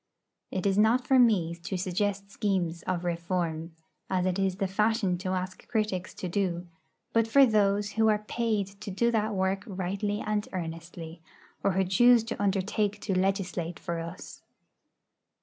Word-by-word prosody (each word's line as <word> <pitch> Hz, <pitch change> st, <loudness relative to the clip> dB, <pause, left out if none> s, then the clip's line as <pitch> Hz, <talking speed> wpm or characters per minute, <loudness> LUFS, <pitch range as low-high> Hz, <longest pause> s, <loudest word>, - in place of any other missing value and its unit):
It 190 Hz, 0 st, -3 dB
is 195 Hz, 0 st, +3 dB
not 235 Hz, +4 st, +4 dB
for 265 Hz, 0 st, +4 dB
me 200 Hz, -9 st, +4 dB
to 170 Hz, +3 st, -5 dB
suggest 200 Hz, +2 st, -1 dB
schemes 185 Hz, -6 st, -1 dB
of 180 Hz, -1 st, -1 dB
reform, 170 Hz, -1 st, -2 dB, 0.3 s
as 185 Hz, -1 st, +1 dB
it 185 Hz, +1 st, 0 dB
is 190 Hz, -1 st, +1 dB
the 195 Hz, +1 st, -1 dB
fashion 210 Hz, 0 st, +1 dB
to 185 Hz, 0 st, -3 dB
ask 185 Hz, 0 st, -4 dB
critics 210 Hz, -5 st, -2 dB
to 185 Hz, -, -4 dB
do, 175 Hz, -1 st, -1 dB, 0.5 s
but 230 Hz, -1 st, +3 dB
for 275 Hz, +4 st, +7 dB
those 205 Hz, -2 st, +2 dB
who 220 Hz, 0 st, +2 dB
are 210 Hz, -1 st, +2 dB
paid 225 Hz, -4 st, 0 dB, 0.2 s
to -, -, -6 dB
do 235 Hz, +5 st, +1 dB
that 215 Hz, -2 st, 0 dB
work 190 Hz, +1 st, 0 dB
rightly 200 Hz, +2 st, -2 dB
and 210 Hz, -1 st, -1 dB
earnestly, 165 Hz, -1 st, -6 dB, 0.4 s
or 195 Hz, -, +2 dB
who 190 Hz, +1 st, +2 dB
choose 235 Hz, +5 st, +5 dB
to 225 Hz, -, -5 dB
undertake 205 Hz, +1 st, 0 dB
to 195 Hz, -, -1 dB
legislate 185 Hz, -3 st, -1 dB
for 170 Hz, -1 st, -4 dB
us. 165 Hz, +2 st, -8 dB
195 Hz, 165 wpm, -28 LUFS, 180-210 Hz, 0.5 s, for